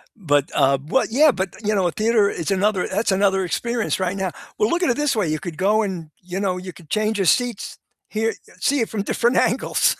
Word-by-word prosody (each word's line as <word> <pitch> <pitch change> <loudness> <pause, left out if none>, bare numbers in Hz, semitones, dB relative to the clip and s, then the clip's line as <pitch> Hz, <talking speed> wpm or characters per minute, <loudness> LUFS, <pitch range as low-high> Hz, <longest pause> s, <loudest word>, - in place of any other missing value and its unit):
But, 145 -8 0
uh 135 -1 +3
well, 265 - +2
yeah, 290 +5 +5
but, 190 -4 -4
you 215 +1 +1
know, 190 -3 +2
a - - -1
theater 215 0 +2
is 165 +4 -3
another 195 0 +1
that's 200 +2 0
another 195 0 +2
experience 235 +4 -1
right 185 +1 -1
now. 190 -2 -2 0.3
Well, 210 - +2
look 350 +1 0
at 325 - +2
it 240 - +1
this 295 -4 +1
way. 205 -6 0
You 155 0 -1
could 170 -4 -7
go 210 +3 +2
and, 175 -6 -4
you 180 +1 -5
know, 185 -2 -1
you 185 0 -7
could 160 -4 -17
change 215 0 0
your 195 - 0
seats. 240 +6 0 0.3
Hear, 225 0 -1 0.3
see 280 +8 +1
it 225 - -1
from 210 -3 -3
different 235 +4 +1
angles. - - +2
200 Hz, 235 wpm, -21 LUFS, 180-220 Hz, 0.3 s, yeah